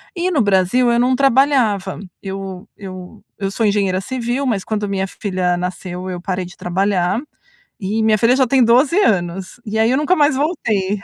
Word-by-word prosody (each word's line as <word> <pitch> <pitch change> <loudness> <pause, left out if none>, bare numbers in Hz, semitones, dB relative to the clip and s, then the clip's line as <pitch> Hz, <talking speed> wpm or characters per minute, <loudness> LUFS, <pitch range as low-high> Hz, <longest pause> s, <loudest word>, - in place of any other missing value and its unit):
E 360 +1 -1
no 300 - +2
Brasil 200 +5 +2
eu 235 - +2
não 250 +1 +3
trabalhava, 260 -8 +2 0.2
eu 195 0 -6
eu 185 -2 -10 0.2
eu 195 -1 -3
sou 220 +3 -1
engenheira 200 -2 +1
civil, 250 +4 -2
mas 215 -7 0
quando 210 0 -2
minha 190 -1 -1
filha 185 -2 -2
nasceu 180 0 -5
eu 180 - -4
parei 185 -1 -3
de 175 - -12
trabalhar 190 +3 0 0.6
e 210 +3 -1
minha 220 -1 +3
filha 230 +4 +3
já 260 - +3
tem 260 +1 +4
12 255 +8 +4
anos 185 - -1
e 215 +1 -3
aí 225 +2 +3
eu 260 - +2
nunca 300 +6 +2
mais 290 -2 +3
voltei. 215 - -1
205 Hz, 185 wpm, -18 LUFS, 185-250 Hz, 0.6 s, tem